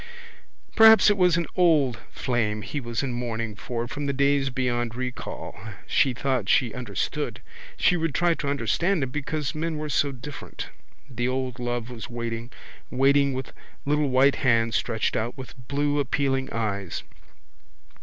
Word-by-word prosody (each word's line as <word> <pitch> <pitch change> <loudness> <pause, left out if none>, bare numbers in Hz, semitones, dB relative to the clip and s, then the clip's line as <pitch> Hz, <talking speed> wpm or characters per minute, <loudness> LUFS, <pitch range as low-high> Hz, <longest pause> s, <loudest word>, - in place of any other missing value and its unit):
Perhaps 220 -1 +8
it - - +2
was 180 -3 +4
an 170 - 0
old 150 - +3
flame 110 -4 -1
he 145 - -4
was 120 -1 -3
in 130 -3 -2
mourning 115 -3 -3
for 120 +3 -4
from 145 +3 -4
the 140 - 0
days 140 0 +2
beyond 120 -2 -1
recall. 125 0 -5 0.3
She 135 - +3
thought 125 -4 -1
she 125 -4 +3
understood. 125 +5 -3 0.4
She 180 - +4
would 165 -3 -1
try 175 0 +3
to 145 - -4
understand 170 +4 +1
him 130 - -3
because 150 -1 -2
men 160 0 -2
were 155 0 -4
so 140 -1 +2
different. 135 +2 -8 0.4
The 120 -2 -2
old 130 -1 -2
love 120 0 -3
was 115 -2 -7
waiting, 115 0 -4 0.4
waiting 140 +1 +3
with 130 0 -5 0.3
little 150 0 +2
white 130 +2 +4
hands 115 -3 +2
stretched 110 +2 0
out, 115 +4 -2
with 130 -1 -8
blue 145 +1 +1
appealing 135 -1 0
eyes. 100 -5 -3
130 Hz, 155 wpm, -25 LUFS, 120-145 Hz, 0.4 s, Perhaps